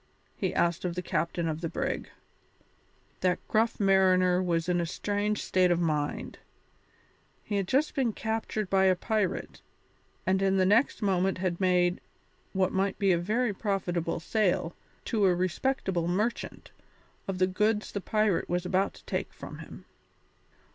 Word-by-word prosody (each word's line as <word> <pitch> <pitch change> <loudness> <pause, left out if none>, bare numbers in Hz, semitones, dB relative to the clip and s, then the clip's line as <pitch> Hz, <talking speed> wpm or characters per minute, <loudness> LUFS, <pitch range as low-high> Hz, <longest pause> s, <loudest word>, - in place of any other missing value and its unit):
he - - -1
asked 170 0 +1
of 175 -2 -2
the 180 - -2
captain 170 0 -1
of 160 0 -3
the 165 - -2
brig. - - -3 1.1
That 180 -1 +2
gruff 225 +1 +1
mariner 185 -2 +4
was 170 -2 0
in 175 -1 +1
a - - -1
strange 205 +3 -1
state 185 -1 +3
of 175 -1 +2
mind. 150 -4 -2 1.0
He 205 - -2
had 195 -2 -1
just 280 +8 +1
been 255 -4 +1
captured 220 -1 -3
by 190 0 +3
a 185 -1 +5
pirate, 210 0 -2 0.6
and 190 +1 +2
in 195 0 +2
the 185 - +3
next 220 +4 +3
moment 190 -1 +1
had 185 -1 -2
made, 180 -1 +2 0.5
what 190 -1 +1
might 190 +1 0
be 195 -2 +3
a 170 - +3
very 215 +5 0
profitable 180 -5 -2
sale, 180 -2 0 0.3
to 215 -3 +1
a 180 -2 +4
respectable 185 -1 -1
merchant, 210 +7 -2 0.6
of 195 -1 -2
the 185 - +4
goods 210 +3 0
the 200 - -3
pirate 215 -2 +1
was 175 +1 -1
about 190 +2 0
to - - -17
take - - -3
from - - -10
him. - - -11
190 Hz, 160 wpm, -29 LUFS, 175-205 Hz, 1.1 s, a